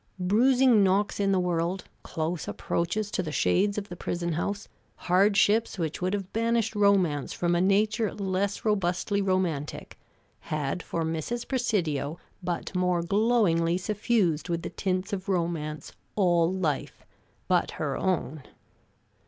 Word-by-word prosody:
Bruising 240 +4 +4
knocks 195 +2 +1
in 200 -1 +2
the 190 - +3
world, 180 +1 -1 0.2
close 160 +1 -3
approaches 205 +5 -2
to - - 0
the 160 -4 -4
shades 200 +6 +2
of 205 -1 -3
the 175 - -8
prison 170 -1 -3
house, 200 +6 -3 0.3
hardships 205 +4 +3
which 165 -2 -3
would 185 +3 0
have 195 -2 -6
banished 230 0 +1
romance 190 -9 +2
from 175 0 0
a 175 - +2
nature 210 +3 +2
less 195 +1 -2
robustly 200 0 +1
romantic, 185 -7 -2 0.4
had 155 +2 -3
for 165 - -3
Mrs. 165 +10 -3
Presidio 170 - -1 0.2
but 175 +1 -3
more 180 -2 +1
glowingly 185 -4 +2
suffused 195 -5 0
with 170 -1 -1
the - - -5
tints 185 0 -2
of 190 0 -4
romance 165 -4 -2 0.2
all 175 -4 +3
life 175 -6 -2 0.4
but - - +2
her - - -2
own! 165 -5 -1
185 Hz, 135 wpm, -27 LUFS, 170-205 Hz, 0.4 s, Bruising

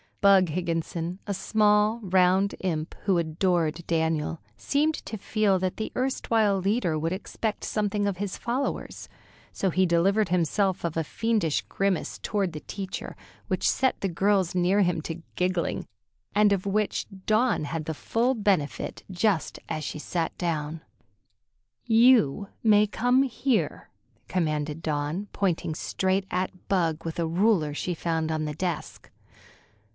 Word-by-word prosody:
Bug 195 -3 +5
Higginson, 170 +1 -2
a 200 - -2
small, 210 +2 +2
round 190 +1 +3
imp, 160 -4 -2
who 195 -3 +3
adored 170 0 0
Daniel, 160 -1 0 0.2
seemed 300 +3 +1
to 220 - -5
feel 205 -1 +1
that 185 0 -2
the 220 - -3
erstwhile 225 -6 +1
leader 190 -4 +1
would 165 +2 -1
expect 210 +3 -3
something 205 -1 0
of 195 -2 -2
his 200 0 -3
followers, 250 +4 -3 0.4
so 195 - 0
he 185 +2 +3
delivered 185 +4 +2
himself 180 +2 +1
of 165 -1 -2
a 165 - +1
fiendish 210 -3 0
grimace 195 -3 -1
toward 195 -5 -1
the 155 - -5
teacher, 195 -1 -6 0.3
which - - 0
set 260 - +1
the 195 - +1
girls 190 0 +1
near 185 +3 +3
him 175 -4 +1
to 165 +2 -6
giggling, 180 -1 -1 0.5
and 210 0 +5
of 200 0 0
which 210 +1 0 0.2
Dawn 220 -5 +2
had 160 +1 -4
the 160 - -2
full 235 - +1
benefit 195 -9 -1
just 185 -1 0
as 155 - -3
she 150 - -4
sat 165 +1 -2
down. 160 -2 -2 1.0
"You 225 - +4 0.2
may 210 -2 +6
come 245 +5 +2
here," 250 - -1 0.4
commanded 155 -3 -1
Dawn, 155 +6 -2
pointing 175 -5 -1
straight 190 +4 -1
at 185 0 -3
Bug 165 -5 0
with 165 +1 -4
a 165 - +1
ruler 170 -3 +2
she 180 - -2
found 160 -1 -1
on 155 -1 -1
the 150 -1 -4
desk. 175 +1 -4
185 Hz, 145 wpm, -26 LUFS, 165-210 Hz, 1.0 s, may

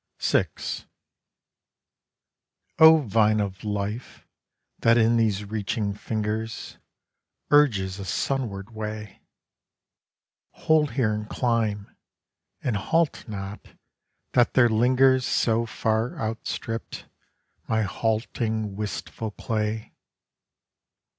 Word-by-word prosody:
VI - - +2 2.3
O 160 0 +9
Vine 110 -3 +2
of 100 -2 -3
Life, 105 +3 -4 0.5
that 115 0 +4
in 115 0 +4
these 105 -3 +1
reaching 105 0 -2
fingers, 110 +1 -4 0.7
Urges 105 -11 +3
a 100 - -5
sunward 110 -1 -2
way! 105 -1 -6 1.3
Hold 150 -5 +2
here 115 -5 +1
and 105 0 -5
climb, 110 -5 -1 0.7
and 120 -5 0
halt 160 +10 0
not, 100 -1 -7 0.6
that 120 -1 +3
there 120 -2 +6
lingers 130 +3 +4
So 115 -1 +1
far 110 +1 -1
outstripped, 115 0 -4 0.6
my 110 -1 +1
halting, 110 0 -1
wistful 105 +1 -4
clay. 110 +1 -3
110 Hz, 90 wpm, -25 LUFS, 105-120 Hz, 2.3 s, O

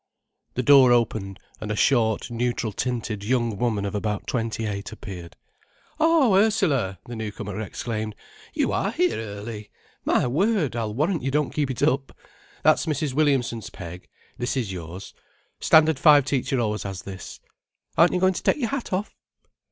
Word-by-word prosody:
The 125 - 0
door 135 -2 +7
opened, 110 -5 0 0.2
and 105 - -6
a 105 - -1
short, 115 -2 +2
neutral 120 -1 -1
tinted 115 -3 -3
young 120 -1 0
woman 110 -3 0
of 100 - -3
about 105 0 -2
twenty 115 -2 -2
eight 100 0 -4
appeared. 90 -5 -9 0.6
"Oh, 315 -8 +4
Ursula!" 175 - +2
the 120 - -7
newcomer 105 -2 -5
exclaimed. 110 +1 -4 0.4
"You - - +1
are - - 0
here 360 +1 +1
early! 105 0 -7 0.3
My - - +2
word, 160 - +1
I'll 110 -2 -2
warrant 160 +6 0
you 135 - -1
don't 150 +1 0
keep 145 -3 0
it 130 - -3
up. 135 +1 0 0.5
That's - - +4
Mr. 150 -2 -1
Williamson's 125 -7 +1
peg. 90 -2 -9 0.3
This 120 +2 -1
is 115 -7 -1
yours. 90 +2 -8 0.5
Standard 160 -2 +5
Five 145 -3 +6
teacher 135 -1 0
always 105 -2 -1
has 95 -2 -6
this. 95 -1 -8 0.6
Aren't 170 +2 +5
you 180 - +1
going 185 +1 +3
to - - -5
take - - +2
your 240 -6 -1
hat 275 -3 -4
off?" 195 +3 -2
120 Hz, 165 wpm, -24 LUFS, 105-145 Hz, 0.6 s, door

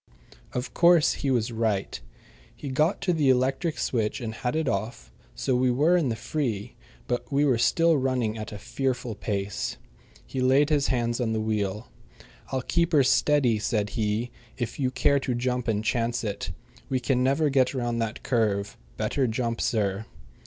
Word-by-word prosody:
Of 125 +2 -4
course 170 -2 +5
he 140 - -2
was 120 -2 +1
right. 110 -4 -1 0.5
He 145 - -7
got 150 +7 +1
to 180 - +1
the 150 -5 +2
electric 135 +5 +1
switch 110 -2 -1
and 115 -3 -4
had 125 +5 -3
it 160 -2 0
off, 100 - -3 0.2
so 130 - 0
we 125 +1 +2
were 150 +8 +3
in 165 -7 +2
the 115 - -1
free; 115 -6 -3 0.3
but 120 - -3
we 140 +1 +3
were 130 -5 +2
still 165 +6 +3
running 130 -5 0
at 110 0 -6
a 105 - -6
fearful 125 +1 -2
pace. 100 -1 -3 0.5
He 130 - -4
laid 135 +4 +4
his 145 -2 +2
hands 120 -1 0
on 110 -2 0
the 110 - 0
wheel. 105 0 -2 0.6
"I'll 130 -1 -1
keep 170 +3 0
her 145 -3 +6
steady," 130 -4 +3
said 105 -1 -1
he, 110 +2 -1 0.3
"if 120 0 -4
you 130 -2 +1
care 140 +2 +2
to 130 -2 -2
jump 125 0 -1
and 110 -1 0
chance 115 0 0
it. 105 -3 -3 0.4
We 130 - +1
can 125 0 +1
never 140 +3 +2
get 135 0 +2
round 120 -2 -1
that 115 0 -4
curve. 105 -5 0 0.2
Better 135 -3 0
jump, 115 0 -2
sir." 105 -1 0
125 Hz, 180 wpm, -26 LUFS, 110-135 Hz, 0.6 s, her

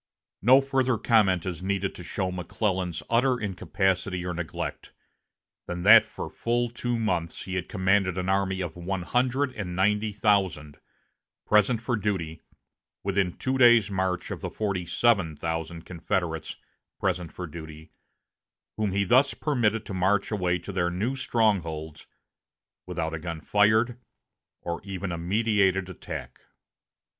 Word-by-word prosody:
No 130 +6 +7
further 130 -3 +1
comment 105 -6 +3
is 90 -3 -4
needed 100 0 -1
to 90 - -9
show 95 +1 -2
McClellan's 90 0 -2
utter 125 +2 +2
incapacity 95 -2 -1
or 90 - -2
neglect, 85 -1 -5 0.7
than 90 0 -4
that 110 +3 +8
for - - -6
full 120 +1 -1
two 120 0 -2
months 90 -7 -2
he 95 - -6
had 90 -2 -3
commanded 95 -1 +1
an 90 0 -2
army 95 0 +1
of 85 -3 -4
one 90 +1 -3
hundred 130 +5 0
and 90 -4 -5
ninety 105 +3 +1
thousand, 95 -8 0 0.7
present 110 +2 +3
for 120 0 0
duty, 90 -7 -2 0.6
within 95 -2 0
two 130 0 -1
days' 120 -4 +6
march 95 -2 -1
of - - -5
the - - -3
forty 100 -5 -2
seven 95 -4 +2
thousand 80 +1 -4
Confederates, 85 -2 -3 0.4
present 90 -3 -1
for 90 - -6
duty, 80 -1 -10 0.9
whom 105 -3 0
he 100 +1 +2
thus 130 +8 +4
permitted 115 -7 0
to - - -6
march 95 +3 +1
away 90 -4 +1
to 90 +3 -8
their 90 -2 0
new 105 +10 -2
strongholds 85 - -1 0.8
without 80 -3 -3
a 80 - -3
gun 85 0 -5
fired 110 +7 +2 0.6
or 85 0 -4
even 95 -1 -4
a 85 - -3
meditated 95 0 +1
attack. 90 - -8
95 Hz, 145 wpm, -27 LUFS, 90-110 Hz, 0.9 s, that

